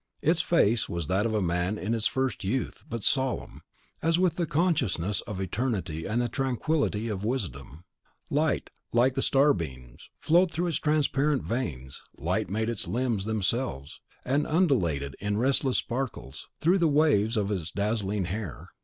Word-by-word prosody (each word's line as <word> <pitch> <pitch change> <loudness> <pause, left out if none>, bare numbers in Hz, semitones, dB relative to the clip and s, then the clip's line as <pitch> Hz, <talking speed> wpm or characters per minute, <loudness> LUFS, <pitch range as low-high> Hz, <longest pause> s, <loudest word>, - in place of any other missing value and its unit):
Its 165 +2 +3
face 120 -9 +2
was 85 -2 -3
that 95 +8 +1
of 110 - -2
a 105 - +1
man 90 +4 0
in 105 +3 -2
its 115 -1 +1
first 130 -4 -1
youth, 115 +7 -2
but 115 -2 -4
solemn, 130 -2 0 0.4
as 165 +1 +2
with 180 -1 +2
the 170 -2 -1
consciousness 125 - +1
of 105 -4 -5
eternity 95 -5 -2
and 110 +4 0
the 120 - +1
tranquillity 130 -2 0
of 105 -3 -3
wisdom; 80 - -4 0.5
light, - - +1 0.2
like 125 +2 +3
starbeams, 80 - 0
flowed 175 +3 +4
through 165 +3 -2
its 170 - 0
transparent 150 -2 +1
veins; 70 - -4 0.2
light - - -1
made 110 +3 -1
its 115 -3 -2
limbs 120 -5 -1
themselves, 110 - -2 0.2
and 140 +4 +1
undulated, 90 - +1
in 105 0 -1
restless 130 +2 +2
sparkles, 120 - -4
through 180 +4 +4
the 170 - +4
waves 140 -8 +3
of 105 -1 0
its 90 -5 -2
dazzling 105 -2 -1
hair. 95 -2 -5
115 Hz, 155 wpm, -28 LUFS, 95-135 Hz, 0.5 s, flowed